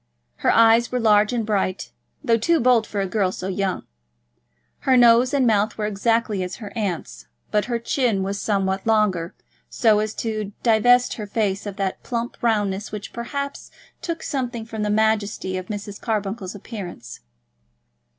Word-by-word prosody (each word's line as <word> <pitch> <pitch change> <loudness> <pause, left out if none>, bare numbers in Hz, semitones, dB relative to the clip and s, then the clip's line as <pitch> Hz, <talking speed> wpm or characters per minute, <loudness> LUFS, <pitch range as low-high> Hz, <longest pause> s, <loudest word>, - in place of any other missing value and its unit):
Her - - +1
eyes 230 +1 +5
were 250 - 0
large 210 -1 +4
and 235 -3 -1
bright, 195 -3 -1 0.3
though 235 -5 +3
too 330 +9 +2
bold 240 -3 +3
for 205 - -2
a - - 0
girl 190 -1 0
so 185 - -5
young. 195 0 -2 0.9
Her 260 -1 +3
nose 240 +1 +6
and 280 -3 +2
mouth 215 -1 +2
were 215 - -1
exactly 215 0 0
as 180 0 -4
her 210 -3 -9
aunt's, 170 - -4 0.2
but 210 -1 +1
her 240 -1 -1
chin 235 -4 0
was 200 +1 -3
somewhat 195 -1 -1
longer, 205 -6 +1 0.3
so 220 -4 +3
as 215 0 -2
to 215 -3 -3
divest 245 +2 +4
her 210 -2 -5
face 205 -1 -1
of 200 - -5
that 195 -2 -3
plump 235 -1 -4
roundness 205 -3 0
which, 210 -1 -7
perhaps, 280 +4 -5 0.3
took 335 -1 -4
something 245 -4 -3
from 225 -1 -6
the 210 - 0
majesty 210 -3 0
of 185 0 -5
Mrs. 205 -1 -6
Carbuncle's 205 -3 -3
appearance. 200 -3 -8
215 Hz, 165 wpm, -22 LUFS, 200-235 Hz, 0.9 s, nose